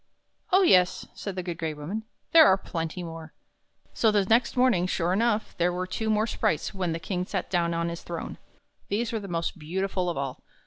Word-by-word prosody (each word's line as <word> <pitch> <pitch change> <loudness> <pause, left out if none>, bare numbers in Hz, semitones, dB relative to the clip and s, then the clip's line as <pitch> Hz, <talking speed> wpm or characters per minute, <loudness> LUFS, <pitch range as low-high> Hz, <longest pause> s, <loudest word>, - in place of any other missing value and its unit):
"Oh, 380 +2 +6
yes," 180 - +4
said 200 -3 -6
the 185 - -3
Good 175 -2 -5
Gray 160 -2 -2
Woman, 185 +10 -5 0.3
"there 320 -2 +9
are 190 - +5
plenty 170 -1 -4
more." 165 -2 -8 0.6
So 225 - +3
the 205 -2 +2
next 235 +5 +2
morning, 245 -9 +3
sure 175 -1 0
enough, 220 +1 0
there 175 +1 +3
were 180 +1 -2
two 220 +4 -3
more 215 0 +2
sprites 165 -8 -1
when 185 -3 -1
the 165 - -2
King 180 +2 -2
sat 185 -1 -4
down 170 -2 +1
on 170 0 0
his 170 0 -6
throne. 170 -1 -6 0.5
These 225 +3 -1
were 225 - -1
the 200 - -8
most 170 -1 -3
beautiful 185 +3 -2
of 170 - -3
all. 135 -2 -4
185 Hz, 210 wpm, -27 LUFS, 170-210 Hz, 0.6 s, there